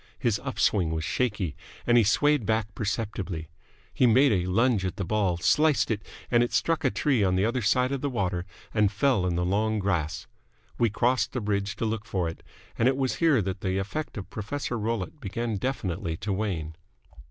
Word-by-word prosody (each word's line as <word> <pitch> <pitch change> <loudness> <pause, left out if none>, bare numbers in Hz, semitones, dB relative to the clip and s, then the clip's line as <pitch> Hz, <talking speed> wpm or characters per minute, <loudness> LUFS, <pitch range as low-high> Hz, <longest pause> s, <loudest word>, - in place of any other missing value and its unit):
His - - 0
up - - -6
swing 90 -6 +2
was 80 0 -2
shaky, 105 - -1 0.3
and 120 - +4
he 120 - +6
swayed 145 +6 +3
back 110 0 0
perceptibly. 100 -7 -3 0.4
He 125 - +4
made 130 +4 +5
a 90 -3 +1
lunge 115 +2 +2
at 95 -1 -2
the 100 - -3
ball, 100 -3 +1
sliced 150 - +3
it, 105 -2 -1 0.3
and 120 -1 +5
it 120 - +1
struck 165 -1 +1
a - - +4
tree 135 -8 +1
on 95 -1 +2
the 95 +2 +2
other 120 +3 0
side 125 +5 +2
of 140 -2 -2
the 145 - -1
water 90 -8 -1 0.3
and 105 -3 +3
fell 105 -4 +2
in 90 - 0
the 90 +1 0
long 110 +4 +1
grass. 85 -6 -1 0.5
We 115 - +4
crossed 125 +5 +1
the 125 - -1
bridge 100 -1 -1
to 115 - -2
look 110 0 -2
for 95 -6 -1
it; 80 - -6 0.4
and 115 - +4
it 135 0 +2
was 130 -2 0
here 155 -10 +3
that 95 0 -4
the 95 0 -1
effect 105 +11 -4
of 100 - -5
Professor 120 +4 -3
Rollitt 115 - -3
began 115 +1 -3
definitely 95 -8 -2
to 100 +2 -2
wane. 90 -6 -2
105 Hz, 205 wpm, -27 LUFS, 95-120 Hz, 0.5 s, he